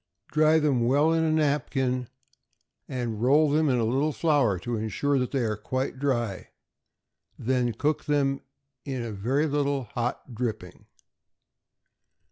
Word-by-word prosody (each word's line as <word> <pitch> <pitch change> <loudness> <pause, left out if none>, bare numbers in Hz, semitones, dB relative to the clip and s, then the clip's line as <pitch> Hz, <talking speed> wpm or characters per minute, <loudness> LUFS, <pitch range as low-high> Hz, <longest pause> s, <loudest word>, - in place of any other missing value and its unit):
Dry 155 +1 +4
them 135 -6 +2
well 145 +5 +3
in 165 0 +2
a 160 - +2
napkin, 135 -4 0 0.8
and 120 -4 -3
roll 145 +4 +4
them 155 0 +3
in 125 - +2
a 115 - +1
little 135 +7 +1
flour 145 - +2
to 120 +7 -4
insure 130 +6 0
that 125 - -1
they 135 -3 -1
are 110 -2 0
quite 130 +5 -3
dry, 120 -8 -1 0.9
then 125 -1 0
cook 150 +5 -1
them 140 -2 +1 0.4
in 130 -4 -4
a 115 - -5
very 125 +9 0
little 145 -2 0
hot 120 +2 -4
dripping. 110 -6 -5
130 Hz, 140 wpm, -26 LUFS, 120-145 Hz, 0.9 s, Dry